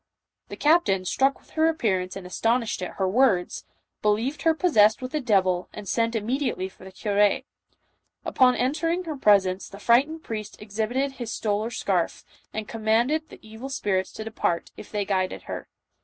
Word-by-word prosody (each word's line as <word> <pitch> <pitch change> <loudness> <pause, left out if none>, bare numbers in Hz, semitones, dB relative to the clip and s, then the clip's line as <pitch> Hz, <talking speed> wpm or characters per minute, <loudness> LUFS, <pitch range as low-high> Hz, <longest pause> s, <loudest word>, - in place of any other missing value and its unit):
The - - -7
captain, 295 - +3
struck 270 +8 +2
with - - -25
her 320 0 +3
appear 225 - +1
ance 185 0 -6
and 195 -2 -7
astonished 225 +4 0
at 180 - -5
her 190 - 0
words, 200 -4 +2 0.4
believed 230 +8 0
her 325 +2 +3
possessed 220 - +4
with 255 +2 -6
a 305 - 0
devil, 190 -6 +2
and 210 -1 -8
sent 230 +3 0
immediately 225 -3 -1
for 190 - -18
the 190 - -10
cure. 205 +1 +2 0.8
Upon 255 -2 +4
entering 330 +7 0
her 320 -3 -4
presence, 200 -6 +3
the 200 - -10
frightened 270 +10 +2
priest 215 -2 -6
exhibited 220 +6 -2
his 240 -4 -6
stole 210 -1 -1
or 225 - -3
scarf, 190 -7 -1 0.3
and 215 -1 -5
commanded 235 +8 +1
the - - -12
evil 220 +5 -8
spirits 190 -8 -1
to 220 - -6
de 225 - -7
part, 170 -5 -1
if - - -11
they 205 -1 -1
guided 185 -2 -1
her. - - -6
220 Hz, 180 wpm, -25 LUFS, 200-265 Hz, 0.8 s, possessed